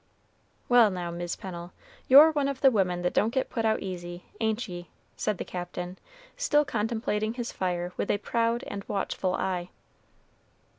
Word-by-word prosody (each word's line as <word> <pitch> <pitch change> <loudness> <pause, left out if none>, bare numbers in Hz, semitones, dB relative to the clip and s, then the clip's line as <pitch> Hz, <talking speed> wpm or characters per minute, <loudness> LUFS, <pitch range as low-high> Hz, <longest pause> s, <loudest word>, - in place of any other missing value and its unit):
"Well, 240 -3 +6
now, 180 -3 -4
Mis' 175 0 -4
Pennel, 175 -2 -8 0.3
you're 290 +5 +9
one 290 -3 +1
of 275 -2 -3
the 270 - +7
women 180 -5 +1
that 180 - 0
don't 215 - +3
get 260 +1 -1
put 225 -2 -1
out 220 0 +2
easy; 175 -2 -6
ain't 220 +1 0
ye?" 175 -2 -8 0.3
said 210 -3 -1
the - - -4
Captain, 180 0 -6 0.4
still 300 -12 +2
contemplating 220 -3 -1
his 240 -1 -4
fire 180 -1 -2
with - - -2
a - - +3
proud 230 +2 0
and 200 -1 -6
watchful 190 -2 -1
eye. 180 -2 -2
205 Hz, 165 wpm, -28 LUFS, 180-235 Hz, 0.4 s, you're